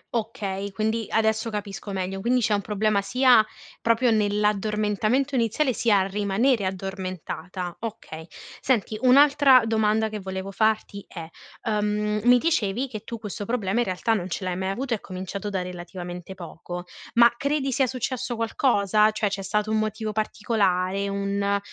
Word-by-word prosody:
Okay, 200 -3 -3
quindi 220 +2 -1
adesso 220 +1 +1
capisco 205 -1 -5
meglio. 195 0 -3
Quindi 250 +2 +2
c'è 215 - +1
un 200 - +1
problema 210 0 +1
sia 245 +2 +5 0.4
proprio 230 +1 +3
nell'addormentamento 210 +4 +1
iniziale, 250 +3 +1
sia 220 -3 +3
a - - 0
rimanere 205 +3 +1
addormentata. 185 -1 -5
Okay. 170 -8 -7 0.3
Senti 225 -4 0
un'altra 275 0 +6
domanda 220 0 +1
che 215 -1 -5
volevo 190 0 -5
farti 215 -1 0
è: 165 -3 -8 0.4
uhm, 210 -1 0
mi 245 0 +7
dicevi 255 - 0
che 215 -4 -5
tu 230 - -6
questo 205 -1 -6
problema 220 -2 -1
in 240 - +2
realtà 185 +5 0
non 185 -3 -2
ce 185 - -4
l'hai 180 -1 -2
mai 190 +1 -2
avuto, 245 +5 -2
è 215 - -1
cominciato 190 +2 -5
da 190 -2 -2
relativamente 180 0 -7
poco. 175 0 -8 0.3
Ma 235 0 +6
credi 280 0 -1
sia 260 +1 +2
successo 255 0 -3
qualcosa? 215 -3 +2
Cioè 215 -1 -1
c'è 195 0 -4
stato 210 +3 -1
un 220 - +2
motivo 215 0 -2
particolare, 200 -3 0
un 200 0 0
210 Hz, 155 wpm, -25 LUFS, 195-230 Hz, 0.4 s, mi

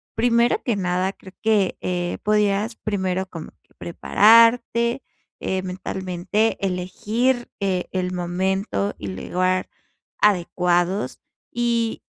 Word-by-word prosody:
primero 235 +1 +2
que 235 - 0
nada, 185 0 -1
creo 190 -2 -15
que, 210 -4 +2
eh, 175 -1 -2
podías 210 +1 +1
primero 190 -4 -2
como 165 -4 -9
que - - -31
prepararte, 230 +6 +4 0.4
eh, 190 0 -2
mentalmente, 185 +3 -2
elegir 215 +7 -1
e 190 -2 -1
el 185 -1 -2
momento 180 - -1
y 100 - -6
lugar 185 - -1 0.5
adecuados, 180 -1 +1 0.3
y 235 -1 -1
190 Hz, 105 wpm, -22 LUFS, 180-225 Hz, 0.5 s, prepararte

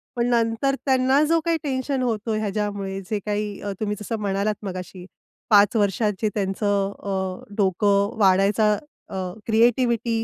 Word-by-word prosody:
पण 235 -1 +1
नंतर 235 +3 +1
त्यांना 265 +1 +3
जो 330 +2 +3
काही 335 -1 +2
टेन्शन 265 -1 -1
होतो 225 -2 -1
ह्याच्यामुळे 205 -2 -2
जे 215 -2 -1
काही 210 -1 -2
अ, 205 - -3
तुम्ही 210 -1 -1
जसं 220 +2 -3
म्हणालात 200 +1 0
मगाशी 185 -1 -7 0.4
5 205 0 +5
वर्षात 210 0 +2
जे 215 - +2
त्यांचं 200 0 0
अ, 190 -2 -3
डोकं 200 +1 +2
वाढायचा 200 +2 +4 0.4
अ, - - -7 0.3
क्रिएटिव्हिटी 230 0 +2
210 Hz, 140 wpm, -23 LUFS, 200-235 Hz, 0.4 s, 5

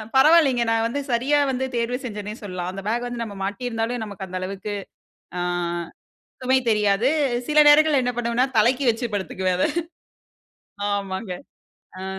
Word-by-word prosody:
பரவாயில்லைங்க, 270 -3 +5
நான் 225 0 +2
வந்து 280 +5 -3
சரியா 260 +5 +2
வந்து 260 0 -1
தேர்வு 235 +1 -1
செஞ்சனே 210 -2 -5
சொல்லலாம், 180 -3 -4
அந்த 195 0 -7
பேக் 240 +2 -1
வந்து 240 -1 -4
நம்ம 205 -3 -8
மாட்டி 205 +6 -3
இருந்தாலும் 225 0 -2
நமக்கு 200 -2 -7
அந்த 185 0 -4
அளவுக்கு, 195 +2 -5 0.7
அ, - - -1 1.0
சுமை 260 +1 +3
தெரியாது, 210 +2 +2 0.4
சில 300 0 +6
நேரங்கள்ல 295 -2 +5
என்ன 245 0 -1
பண்ணுவேனா, 240 +2 +1
தலைக்கு 250 +5 +3
வைச்சி 230 +2 -3
படுத்துக்குவேன் 185 -2 -1
அத, - - +3 1.2
ஆமாங்க 195 0 -3 0.7
அ. - - -5
230 Hz, 150 wpm, -23 LUFS, 200-255 Hz, 1.2 s, சில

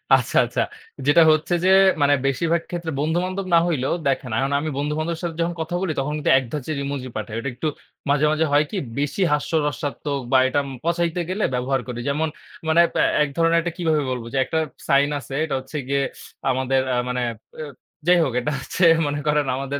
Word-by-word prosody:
আচ্ছা, - - -1
আচ্ছা। - - -2 0.5
যেটা 155 +3 +6
হচ্ছে 155 +3 +1
যে - - +5 0.3
মানে 145 0 +5
বেশিরভাগ 165 +5 +1
ক্ষেত্রে 170 -2 -4
বন্ধু-বান্ধব 180 +5 -1
না 165 - +7
হইলেও 135 -5 0
দেখেন, 130 -2 0
এখন 135 +1 0
আমি 155 +1 -3
বন্ধু-বান্ধবের 155 +3 -2
সাথে 165 -2 -3
যখন 170 +1 0
কথা 170 +2 -3
বলি 185 -4 -1
তখন 140 +2 -1
কিন্তু 150 - +1
এক 130 - +1
ধাঁচের 150 0 -3
ইমোজি 140 -2 -4
পাঠাই। 110 0 -5
ওটা 140 - -3
একটু 155 +6 -3 0.4
মাঝে, 145 +1 +3
মাঝে, 160 +1 +2
হয় 145 +1 +4
কি? 205 - -3 0.2
বেশি 145 +7 -1
হাস্যরসাত্মক 145 -2 -1
বা 130 - +6
এটা 145 +2 +1
উম - - -7
পচাইতে 170 +1 0
গেলে 205 +3 -1
ব্যবহার 130 +1 0
করি। 120 -1 -5
যেমন 155 +3 0 0.4
মানে 165 +2 +5
প্যা - - +2 0.2
এক 145 - -2
ধরনের 165 0 +4
একটা 170 0 -4
কিভাবে 160 -4 +1
বলব? 125 -2 -3
যে, - - 0
একটা 160 - -1 0.3
সাইন 140 +1 +4
আছে, 130 +1 -10
এটা 145 - -2
হচ্ছে 130 +4 -7
গিয়ে 140 0 +1 0.5
আমাদের 130 +1 +1
আ - - +1
মানে 125 0 -1 0.4
এ - - -3 0.4
যাই 180 - +6
হোক 130 - -1
এটা 150 - -2
হচ্ছে 180 +7 -3 0.2
মনে 145 0 -2
করেন 150 -1 +2
আমাদের 140 +1 -3
150 Hz, 200 wpm, -22 LUFS, 135-165 Hz, 0.5 s, না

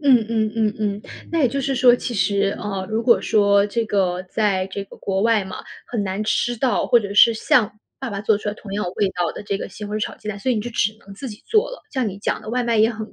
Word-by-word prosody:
嗯 280 -3 +6
嗯 220 -2 0
嗯 215 -2 +1
嗯， 205 -1 -2 0.3
那 330 - +2
也 260 - +4
就 275 +3 -2
是 270 0 -1
说， 245 -1 +6
其 245 -1 -4
实， 200 0 +1
呃， 195 -2 -3
如 220 +1 -1
果 235 -1 +5
说 200 -2 +3
这 230 +2 -1
个 185 -4 0
在 190 -1 0
这 195 +1 -5
个 - - -14
国 195 0 -1
外 225 -3 +3
嘛， 190 - -7 0.3
很 225 -4 -2
难 190 +2 -2
吃 240 +2 0
到， 245 -2 +1
或 240 - +5
者 200 -2 -5
是 230 +2 +7
像 215 -1 +2 0.2
爸 265 - -4
爸 200 -2 -4
做 210 0 +2
出 210 - -4
来 205 - -2
同 200 -2 -10
样 205 -1 -1
味 200 - +2
道 175 -2 -1
的 - - -8
这 200 -1 -2
个 - - -5
西 210 +3 -9
红 210 +1 -3
柿 - - -3
炒 - - -3
鸡 215 - -9
蛋， 200 - -4
所 260 +6 -1
以 - - +1
你 215 - 0
就 240 +3 -5
只 215 -1 0
能 200 - -13
自 265 +5 -6
己 210 - -10
做 445 +3 +3
了， - - -9
像 255 -5 0
你 195 - -7
讲 - - -2
的 - - -10
外 250 +2 0
卖 235 -1 +1
也 220 +1 +5
很 220 -1 -7
215 Hz, 305 characters per minute, -22 LUFS, 200-235 Hz, 0.3 s, 是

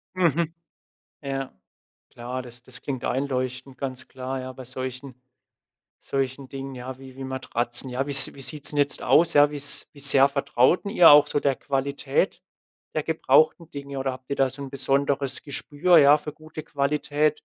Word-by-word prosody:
Mhm. 170 -2 +1 0.7
Ja. 135 -1 -4 0.6
Klar, 125 +2 -6
das 120 0 -13
das 130 - -11
klingt 130 -3 -4
einleuchtend, 130 0 -3
ganz 130 -1 -6
klar, 130 0 -5
ja, 130 0 -7
bei 130 0 -11
solchen, 130 +1 -7 0.9
solchen 135 0 -3
Dingen 135 0 -7
ja 130 +1 -8
wie 130 -1 -13
wie 135 - -7
Matratzen, 130 -1 -1
ja, 130 +3 -2
wie's 140 -1 +5
wie 135 - -10
sieht's 150 +1 -3
'n - - -5
jetzt 145 0 0
aus, 170 +1 +4
ja, 145 0 +6
wie's 145 -1 -1
wie 145 - -15
sehr 140 0 +6
vertraut 140 - +1
denn 200 - -4
ihr 175 -8 +8
auch 145 0 +8
so 145 - 0
der 140 -2 +1
Qualität 140 0 -2 0.5
der 155 - 0
gebrauchten 155 +1 +2
Dinge 140 -1 -7
oder 135 0 -2
habt 130 +1 -12
ihr 140 - -1
da 135 -1 +2
so 140 +2 -9
'n 135 - -7
besonderes 140 0 -1
Gespür 150 +4 +2
ja 145 +1 +6
für 150 0 -7
gute 155 0 -10
Qualität? 150 +1 0
135 Hz, 175 wpm, -24 LUFS, 130-145 Hz, 0.9 s, ihr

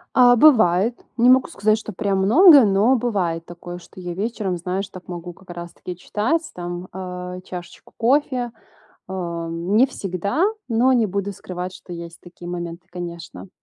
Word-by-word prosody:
А, 245 -1 +7
бывает, 225 - +4
не 240 +2 +5
могу 260 0 +5
сказать, 215 +1 +1
что 215 -1 -7
прям 195 +1 0
много, 280 - +8
но 205 +6 +4
бывает 185 -9 -1
такое, 175 +1 -9
что 180 +1 -14
я 180 -1 -5
вечером, 200 -1 -2
знаешь, 185 +3 -3
так 185 -2 -12
могу 175 -1 -7
как 185 +1 -14
раз 175 0 -7
таки 180 +1 -8
читать 215 - -1
там, 175 +1 -5
э, 180 -1 -6
чашечку 175 -2 -10
кофе, 250 -1 +1 0.6
а, 170 -3 -4
не 180 +8 +2
всегда, 200 - -2 0.2
но 240 +3 +3
не 235 -4 +3
буду 200 +1 -3
скрывать, 180 -1 -6
что 180 - -11
есть 170 0 -8
такие 175 0 -11
моменты, 175 0 -6
конечно. 170 +1 -8
185 Hz, 165 wpm, -22 LUFS, 175-225 Hz, 0.6 s, много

